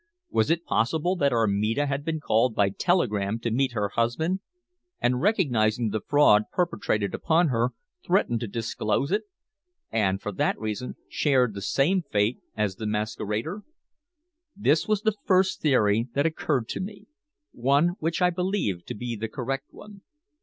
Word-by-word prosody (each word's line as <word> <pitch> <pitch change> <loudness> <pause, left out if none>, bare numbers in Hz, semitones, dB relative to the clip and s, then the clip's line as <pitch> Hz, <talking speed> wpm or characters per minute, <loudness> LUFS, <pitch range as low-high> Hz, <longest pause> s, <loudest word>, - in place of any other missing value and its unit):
Was 110 +5 +2
it 170 +1 +1
possible 160 +10 +1
that 140 -4 +2
Armida 110 +3 +1
had 140 0 -2
been 160 0 -2
called 115 -4 +2
by 100 -2 +3
telegram 105 - 0
to 115 - -2
meet 130 +2 +1
her 105 -3 -1
husband, 120 - 0 0.6
and 125 0 +1
recognizing 120 - +2
the 110 - -2
fraud 110 -8 +4
perpetrated 105 - -1
upon 165 0 +2
her 120 0 0 0.3
threatened 175 - +1
to 115 - -4
disclose 115 - -1
it 205 - 0 0.7
and, 95 -4 +1
for 105 - -4
that 95 - 0
reason, 110 +3 -4
shared 130 -6 +2
the 100 - -6
same 160 - +2
fate 105 -5 0 0.2
as 105 -3 -1
the 110 - -4
masquerader? 105 - -2 0.9
This 155 -6 +2
was 215 -1 +1
the 220 -2 +2
first 190 -1 +3
theory 115 -5 +3
that 140 +2 +2
occurred 150 -6 0
to - - -3
me; 200 +2 -7 0.5
one 140 +7 +2
which 165 +3 -1
I 180 - +4
believed 180 - -2
to - - -5
be 120 +2 -4
the 110 +1 -4
correct 135 +3 -4
one. 205 -1 -13
125 Hz, 160 wpm, -26 LUFS, 110-165 Hz, 0.9 s, fraud